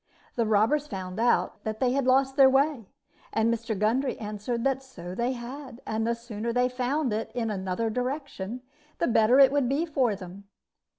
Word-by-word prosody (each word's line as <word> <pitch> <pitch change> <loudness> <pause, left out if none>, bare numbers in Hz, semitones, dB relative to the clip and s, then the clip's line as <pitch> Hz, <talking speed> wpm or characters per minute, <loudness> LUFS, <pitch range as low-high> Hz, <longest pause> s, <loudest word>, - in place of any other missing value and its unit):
The 230 -2 0
robbers 225 +8 +2
found 185 -4 -6
out 240 +1 +1
that 220 0 -4
they 250 -1 +2
had 270 0 0
lost 265 +1 +3
their 270 -2 +7
way, 270 -4 +1 0.4
and 225 +1 +2
Mr. 225 -2 -3
Gundry 240 +6 +1
answered 215 +2 -4
that 270 -1 +1
so 180 -10 -9
they 235 +6 -1
had, 255 +1 -8
and 220 +1 -1
the 235 - +1
sooner 235 -1 -5
they 250 +1 +2
found 255 +1 -1
it 220 +1 -3
in 225 -3 -1
another 190 +3 -2
direction, 250 -3 -4 0.3
the - - +1
better 225 +2 +4
it 270 -1 +8
would 280 -3 +1
be 290 +5 +1
for 260 -9 +1
them. 190 +1 -10
235 Hz, 185 wpm, -27 LUFS, 215-265 Hz, 0.4 s, it